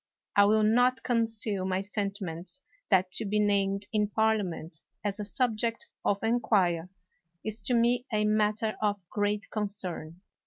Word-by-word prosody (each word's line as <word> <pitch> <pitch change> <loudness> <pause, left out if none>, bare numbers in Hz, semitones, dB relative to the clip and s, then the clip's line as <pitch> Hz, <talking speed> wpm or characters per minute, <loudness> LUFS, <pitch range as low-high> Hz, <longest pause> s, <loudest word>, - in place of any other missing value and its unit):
I 200 - +7
will 215 +1 +4
not 245 +4 +3
conceal 225 -4 0
my 185 0 0
sentiments 200 - -4 0.3
that 185 0 +3
to 215 - +1
be 210 +1 0
named 200 -1 +1
in 210 -1 +2
Parliament 205 -7 0 0.3
as 205 0 -2
a 210 - -3
subject 230 0 -1
of 200 - +2
inquiry 195 -7 +2 0.6
is 215 0 -3
to 245 +5 +1
me 240 +2 +2
a 210 -1 +1
matter 215 +1 +1
of 205 -1 +1
great 205 0 -1
concern. 185 -5 -3
210 Hz, 145 wpm, -29 LUFS, 195-220 Hz, 0.6 s, I